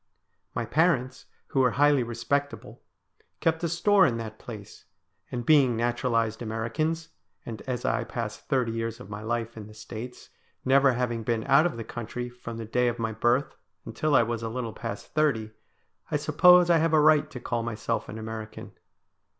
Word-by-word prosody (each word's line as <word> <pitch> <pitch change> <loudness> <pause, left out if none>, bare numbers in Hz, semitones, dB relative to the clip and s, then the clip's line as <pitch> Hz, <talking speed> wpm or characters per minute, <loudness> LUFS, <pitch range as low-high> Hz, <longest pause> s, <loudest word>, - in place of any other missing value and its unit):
My 115 - -1
parents, 135 -3 +1 0.2
who 135 - 0
were 125 -2 +3
highly 145 -1 +5
respectable, 120 +5 -3 0.6
kept 165 0 0
a 170 - +1
store 190 +3 +4
in 115 -4 -1
that 110 -1 -7
place; 105 -4 -10 0.5
and 120 -1 -4
being 135 -5 +5
naturalised 115 -1 0
Americans, 120 +9 -2 0.4
and 115 -2 -7
as 125 -2 -3
I 120 - +1
passed 115 -2 -6
thirty 125 -5 +1
years 115 0 -3
of 125 - -11
my 105 +1 -6
life 115 +1 -3
in 105 -2 -8
the 105 - -14
States, 110 +3 -9 0.3
never 135 0 +5
having 120 -2 -1
been 110 0 -1
out 155 +5 +5
of 170 - -6
the 115 - -4
country 120 +2 -6
from 120 -1 -8
the 115 - -5
day 125 +3 +1
of 120 - -1
my 115 -1 -2
birth 120 +5 +1 0.3
until 155 -2 0
I 120 - +6
was 115 0 -3
a 115 - -3
little 115 -1 -4
past 115 - -7
thirty, 120 -9 +1 0.6
I - - +1
suppose 180 -1 +6
I 170 - +6
have 165 0 +1
a 155 - +6
right 150 0 +4
to 125 - -8
call 120 -1 -2
myself 115 0 -3
an 110 - -6
American. 110 0 -7
120 Hz, 180 wpm, -27 LUFS, 115-140 Hz, 0.6 s, I